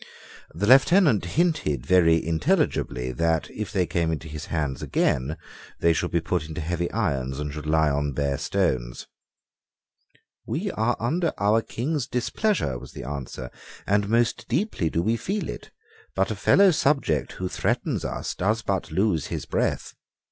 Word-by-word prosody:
The 95 +5 -2
Lieutenant 135 - +5
hinted 85 - 0
very 80 -2 +4
intelligibly 75 -5 0
that, 80 +5 0
if 105 0 -5
they 95 -4 +1
came 85 -1 0
into 80 +1 -4
his 75 -1 -7
hands 75 -5 -2
again, 70 +5 0 0.4
they 85 - +4
should 90 +1 -1
be 85 - +1
put 80 -1 -2
into 80 - -5
heavy 85 +2 -2
irons 70 - -1
and 75 -1 -4
should 75 0 -6
lie 80 -1 +3
on 70 0 -1
bare 70 0 -1
stones. - - -1 1.4
"We 190 +5 -3
are 115 -1 0
under 160 +8 0
our 105 +2 +3
King's 135 +4 -3
displeasure," 125 - -1
was 65 +1 -12
the - - -7
answer; 65 -3 -6 0.3
"and 100 0 +1
most 115 +1 +1
deeply 135 - 0
do 85 - -1
we 115 +4 +1
feel 200 - -3
it: - - -7 0.5
but - - +1
a - - -2
fellow 195 -1 +5
subject 140 - +1
who 95 - -4
threatens - - -1
us - - -3
does 110 +4 0
but 100 -3 -1
lose 95 -6 +1
his - - -4
breath." - - -1
85 Hz, 160 wpm, -25 LUFS, 75-115 Hz, 1.4 s, Lieutenant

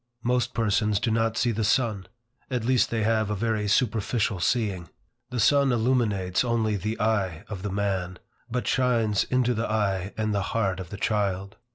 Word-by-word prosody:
Most 125 +1 0
persons 105 -2 +1
do 110 +2 0
not 115 0 +1
see 120 - +2
the 110 0 -1
sun. 105 -4 +1 0.4
At 125 -4 -2
least 125 0 +3
they 115 -2 -1
have 110 -1 +1
a 105 - -1
very 110 0 -1
superficial 105 -2 +1
seeing. 95 - 0 0.4
The 125 -1 -3
sun 140 +3 +4
illuminates 110 -6 +1
only 115 -3 0
the 105 +4 -3
eye 100 -5 0
of 100 -4 -6
the 105 - -3
man, 95 -2 -2 0.3
but 125 +1 -2
shines 115 -6 +2
into 125 -1 +1
the 115 0 -2
eye 100 -3 -1
and 110 -1 0
the 100 - 0 0.2
heart 95 -5 0
of 90 -3 -7
the 100 - -7
child. 100 -2 -1
110 Hz, 180 wpm, -26 LUFS, 100-115 Hz, 0.4 s, sun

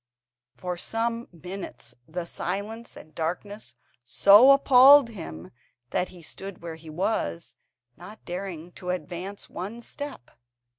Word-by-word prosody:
For 180 -1 -4
some 230 +4 -1
minutes 180 -8 -7
the 170 +2 -4
silence 205 +7 -4
and 155 - -13
darkness 175 - -4 0.3
so 200 - +7
appalled 275 -1 +8
him 95 - -8 0.4
that 180 - 0
he 175 -2 -14
stood 195 +2 -8
where 165 -1 -5
he 160 0 -12
was, 155 - -2 0.4
not 205 +6 -13
daring 175 -2 -6
to 180 - -5
advance 180 +3 -4
one 205 +6 -6
step. 285 - -5
185 Hz, 120 wpm, -26 LUFS, 170-220 Hz, 0.4 s, appalled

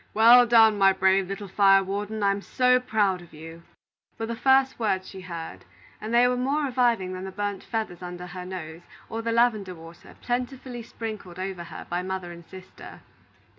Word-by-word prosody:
"Well 240 +3 +7
done, 220 -3 +5
my 195 0 +5
brave 190 0 +2
little 195 +1 -6
fire 195 0 +4
warden! 205 +2 -4
I'm 200 0 +1 0.5
proud 200 -4 +1
of 170 -3 -16
you!" 165 +2 -11 0.6
were 225 - -3
the 230 +1 -4
first 265 +2 +3
words 190 -4 -1
she 190 - -10
heard; 170 -3 -8 0.4
and 215 - -5
they 240 +1 +5
were 250 - +1
more 275 +5 0
reviving 240 -8 +1
than 185 0 -6
the 190 - -6
burnt 205 0 -4
feathers 215 -6 -4
under 180 0 -7
her 180 0 -8
nose, 175 -3 -7 0.3
or 225 - -4
the 230 0 -2
lavender 220 -5 +1
water 165 +1 -14
plentifully 250 0 -4
sprinkled 215 -6 -8
over 185 -2 -5
her 170 - -9
by 175 - -3
her - - -4
mother 190 -2 -4
and 170 0 -11
sister. 185 0 -12
195 Hz, 185 wpm, -25 LUFS, 185-230 Hz, 0.6 s, Well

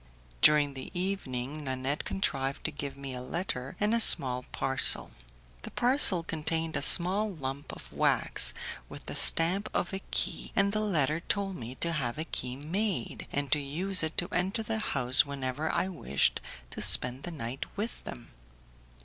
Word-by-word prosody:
During 150 -2 +4
the 130 -1 -9
evening 150 -7 -5
Nanette 130 +2 -4
contrived 135 -8 -4
to - - -3
give 140 -1 -8
me 135 -1 -8
a 125 - -6
letter 135 -2 -5
and 210 +2 0
a 235 - +2
small 125 - +7
parcel. 135 0 +2 0.5
The - - -9
parcel 245 - +3
contained 160 0 -3
a - - -2
small 190 +8 +5
lump 140 -5 -7
of - - -13
wax - - +4 0.3
with - - -12
the - - -7
stamp 180 +5 +4
of 180 - -2
a 190 - -5
key, - - -3
and 200 0 +1
the 215 - -1
letter 160 -7 0
told 195 +2 -3
me 125 -3 -9
to 170 +5 -2
have 135 -6 -4
a 155 - -3
key 125 -6 -5
made, 165 - -4
and 140 -2 -4
to 150 - +2
use 175 +7 -1
it 160 0 -5
to 175 - +1
enter 190 +5 -2
the 220 0 -4
house 130 - +2
whenever 140 +1 -5
I - - -1
wished 160 - -1 0.3
to - - -7
spend 125 +2 +5
the 175 - -8
night 135 -4 -7
with 220 +3 -6
them. - - -11
150 Hz, 175 wpm, -28 LUFS, 130-190 Hz, 0.5 s, small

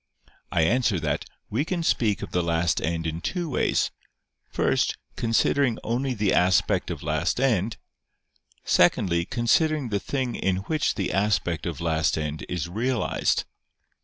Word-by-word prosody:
I 85 - +2
answer 115 +1 +2
that, 75 -1 -1 0.3
We 120 +7 +1
can 175 0 -2
speak 110 -9 +1
of - - -7
the 90 - +1
last 85 -1 +1
end 80 0 -2
in 80 +1 -3
two 175 - -2
ways: - - +1 0.6
first, - - +1 0.2
considering 120 +2 +2
only 125 +3 -1
the 105 -2 +1
aspect 90 -2 +2
of - - -5
last - - 0
end; 115 -5 +1 0.9
secondly, 85 -2 +3
considering 135 - +1
the 100 -1 0
thing 130 +1 -2
in 95 0 -1
which 155 -2 0
the 95 - -2
aspect 95 -5 0
of 85 -4 -5
last 80 -2 +1
end 75 0 -4
is 85 -2 -2
realized. 115 +7 0
100 Hz, 145 wpm, -25 LUFS, 85-125 Hz, 0.9 s, secondly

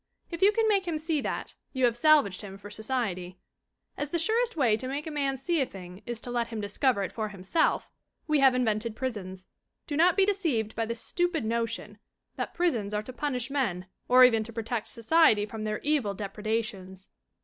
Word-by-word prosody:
If 335 - -5
you 395 +2 +7
can 445 +1 +1
make 395 -4 +2
him 330 -2 -1
see 310 -1 -1
that, - - -4 0.2
you 260 -2 +2
have 235 -1 +2
salvaged 280 -8 +4
him 195 -1 -9
for 205 +1 -11
society. 210 -6 -3 0.6
As 290 - -3
the 340 - 0
surest 445 +5 +1
way 240 -7 +4
to 255 +4 -4
make 280 +3 -3
a 315 - -5
man 275 -2 -1
see 325 +4 0
a - - +2
thing 185 -1 -10
is 240 -1 -3
to 245 - -5
let 240 -1 0
him 225 -2 -5
discover 205 +2 +1
it 190 - -4
for 220 -2 -3
himself 195 - 0 0.4
we 305 -2 +2
have 265 -2 +5
invented 225 -2 0
prisons. 190 -7 -5 0.4
Do 295 - -4
not 345 +5 +4
be 390 - +5
deceived 315 - 0
by 225 0 -1
the 230 - -2
stupid 340 +3 -1
notion 230 -2 -2 0.4
that - - -4
prisons 230 - 0
are 210 - -1
to 255 - -9
punish 255 -2 -2
men 220 -11 -1 0.2
or 255 +1 +7
even 230 -3 +6
to 230 - -8
protect 225 0 -3
society 230 -3 +3
from 215 +1 -6
their 215 0 -1
evil 280 -9 +1
depredations. 200 -2 -4
235 Hz, 205 wpm, -28 LUFS, 210-295 Hz, 0.6 s, you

